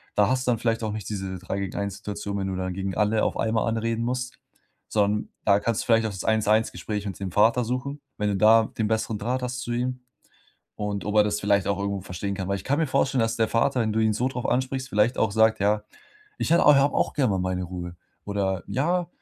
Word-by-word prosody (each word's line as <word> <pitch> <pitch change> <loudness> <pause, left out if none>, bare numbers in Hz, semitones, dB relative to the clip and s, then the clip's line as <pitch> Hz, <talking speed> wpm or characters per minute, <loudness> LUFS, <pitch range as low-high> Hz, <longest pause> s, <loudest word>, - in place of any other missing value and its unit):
Da 105 -1 +4
hast 130 0 0
du - - +4
dann 115 - +1
vielleicht 115 -1 0
auch 110 - -1
nicht 110 -2 -6
diese 95 -2 -4
3 95 +2 -4
gegen 100 -2 -4
1 100 -1 -3
Situation, 100 -1 -5
wenn 95 - -2
du 95 - -3
dann 95 0 -3
gegen 95 0 -3
alle 105 +1 +2
auf - - 0
einmal 110 0 0
anreden 115 0 -1
musst. 125 +1 -3 0.5
Sondern 105 0 +1 0.2
da 100 -1 +5
kannst 115 -1 -1
du - - -12
vielleicht 115 -1 +3
auch - - -4
das 95 - -6
1 110 -1 +1
1 110 +1 +3
Gespräch 105 -1 -4
mit 100 -1 -5
dem 95 -2 -4
Vater 115 +5 +3
suchen. 130 +4 -3 0.2
Wenn 105 0 0
du 100 - 0
da 110 +2 +6
den 110 -2 +1
besseren 110 -1 -1
Draht 125 +4 -2
hast 125 0 -3
zu 120 -1 -3
ihm 125 +1 -2 0.8
und 105 -1 -3
ob 105 - -3
er 105 - +7
das 105 0 -1
vielleicht 100 -1 +2
auch 100 - +1
irgendwo 100 0 -2
verstehen 95 +2 -4
kann. 95 -1 -4
Weil 100 - 0
ich 95 - -9
kann 140 +2 +1
mir 160 - +2
vorstellen, 135 -1 +1
dass 115 - 0
der 110 -1 +2
Vater, 125 +3 +1
wenn 110 - -1
du 110 - +1
ihn 110 -1 +3
so 125 +4 0
drauf 125 -2 -4
ansprichst, 130 +1 -1
vielleicht 105 +1 +2
auch 110 - +2
sagt: 110 -1 +3
„Ja, 105 +1 +2 0.6
ich - - -2
hät 170 - +5
habe 145 -1 +5
auch - - +1
gerne 130 -6 +2
mal 95 - 0
meine 90 0 -1
Ruhe.“ 90 -1 -7 0.3
Oder: 95 -2 -1
„Ja, 175 +6 0
110 Hz, 255 wpm, -25 LUFS, 100-120 Hz, 0.8 s, er